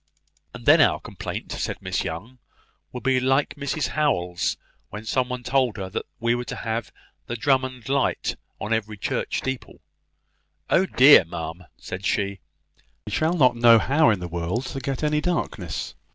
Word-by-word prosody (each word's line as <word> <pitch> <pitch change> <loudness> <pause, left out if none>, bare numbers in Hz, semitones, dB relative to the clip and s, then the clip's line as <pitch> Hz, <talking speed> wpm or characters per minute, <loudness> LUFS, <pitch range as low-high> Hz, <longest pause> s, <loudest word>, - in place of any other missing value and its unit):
"And - - -10
then - - +7
our - - +4
complaint," - - -7
said - - -3
Miss - - -2
Young, 105 +11 -6 0.5
"will 125 - -6
be 130 -1 +2
like 135 +3 +1
Mrs 140 0 -2
Howell's, 90 - 0 0.3
when 105 +2 -8
somebody 125 +1 -1
told 130 -3 +1
her 95 -1 -5
that - - -4
we 115 +1 +2
were 120 0 -2
to - - -5
have 115 0 -3 0.4
the 120 - -3
Drummond 130 -1 0
light 140 0 0 0.2
on 110 - -2
every 110 -1 -2
church - - -2
steeple. 130 -1 -5 0.9
`Oh 190 +1 +3
dear, 135 -4 +9
ma'am!' 80 +1 -7
said 95 +2 -7
she, 100 -1 -1 0.7
`we 105 - -5
shall 160 +2 +2
not 130 -7 +4
know 115 -1 +7
how 140 +5 +3
in 105 -4 +1
the 90 - -5
world 85 +9 -2
to 135 - -3
get 135 +1 -3
any 150 0 +1
darkness.'" 175 +1 -3
125 Hz, 165 wpm, -24 LUFS, 105-135 Hz, 0.9 s, dear